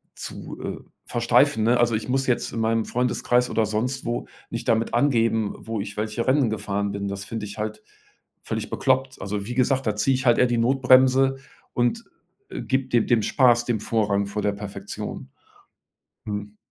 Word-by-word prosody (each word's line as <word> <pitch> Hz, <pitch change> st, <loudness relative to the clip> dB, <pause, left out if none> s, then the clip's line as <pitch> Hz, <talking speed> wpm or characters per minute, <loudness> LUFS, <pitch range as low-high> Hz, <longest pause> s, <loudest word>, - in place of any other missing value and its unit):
zu, -, -, -8 dB
äh, -, -, -5 dB, 0.3 s
versteifen“, 120 Hz, 0 st, +3 dB
ne? 120 Hz, +2 st, +3 dB
Also 120 Hz, -1 st, +3 dB
ich 110 Hz, -, -4 dB
muss 135 Hz, +1 st, +1 dB
jetzt 125 Hz, -, 0 dB
in 115 Hz, -, -3 dB
meinem 115 Hz, 0 st, +1 dB
Freundeskreis 125 Hz, 0 st, +1 dB
oder 110 Hz, -, +2 dB
sonst 125 Hz, +6 st, -2 dB
wo 120 Hz, 0 st, -2 dB, 0.3 s
nicht 115 Hz, +1 st, -5 dB
damit 115 Hz, 0 st, +1 dB
angeben, 115 Hz, -5 st, +2 dB
wo 115 Hz, -2 st, -4 dB
ich 100 Hz, +1 st, -7 dB
welche 110 Hz, +2 st, -2 dB
Rennen 130 Hz, -2 st, +3 dB
gefahren 100 Hz, -1 st, -2 dB
bin. 100 Hz, 0 st, -3 dB
Das 100 Hz, 0 st, -5 dB
finde 110 Hz, 0 st, -5 dB
ich 100 Hz, 0 st, -9 dB
halt 105 Hz, 0 st, -4 dB, 0.6 s
völlig -, -, -3 dB
bekloppt. 130 Hz, 0 st, 0 dB
Also, 100 Hz, +1 st, -3 dB
wie 120 Hz, +3 st, -5 dB
gesagt, 130 Hz, 0 st, +1 dB
da 105 Hz, -, +1 dB
ziehe 120 Hz, +6 st, +2 dB
ich 130 Hz, +1 st, -3 dB
halt 120 Hz, -2 st, +5 dB
eher 125 Hz, -, +5 dB
die 120 Hz, -1 st, 0 dB
Notbremse 130 Hz, +2 st, +4 dB, 0.4 s
und, 125 Hz, -, 0 dB, 0.5 s
äh, -, -, -5 dB
gebe 130 Hz, 0 st, -1 dB
de 120 Hz, -2 st, +3 dB
dem 120 Hz, -3 st, +3 dB
Spaß, 120 Hz, -2 st, +4 dB
dem 120 Hz, -3 st, 0 dB
Vorrang 105 Hz, -3 st, +1 dB
vor 105 Hz, +1 st, -3 dB
der 105 Hz, -, +2 dB
Perfektion. 100 Hz, -1 st, -7 dB, 1.0 s
Mhm. 105 Hz, -1 st, -5 dB
115 Hz, 185 wpm, -24 LUFS, 105-125 Hz, 1.0 s, halt